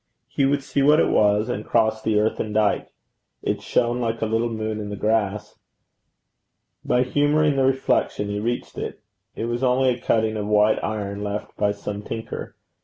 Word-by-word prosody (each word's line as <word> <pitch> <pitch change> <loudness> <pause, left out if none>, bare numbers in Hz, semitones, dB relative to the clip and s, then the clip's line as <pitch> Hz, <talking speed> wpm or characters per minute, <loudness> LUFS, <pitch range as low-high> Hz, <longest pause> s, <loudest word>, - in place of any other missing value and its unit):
He 140 - 0
would 140 0 0
see 140 - -1
what 150 +3 +5
it - - +3
was, 105 +1 +3
and 110 -4 -3
crossed 110 -1 +1
the 110 -1 +2
earthen 105 0 -1
dyke. 105 -1 +1 0.5
It - - -1
shone 120 +1 0
like 115 -1 -1
a - - 0
little 115 +2 0
moon 110 -1 -3
in 105 -1 -5
the 105 - -4
grass. 105 0 -1 1.2
By 125 0 +2
humouring 145 +3 +2
the 135 -1 +2
reflection 130 -5 +1
he 100 0 -2
reached 120 +3 -3
it. - - -5 0.4
It 115 - -3
was 120 +1 -2
only 130 0 +3
a 120 -1 -1
cutting 110 -1 +1
of 105 -1 -3
white 105 0 +3
iron, 100 -1 -3
left 105 0 -4
by 105 -1 +1
some 100 0 -5
tinker. 110 +2 -6
110 Hz, 180 wpm, -23 LUFS, 105-125 Hz, 1.2 s, what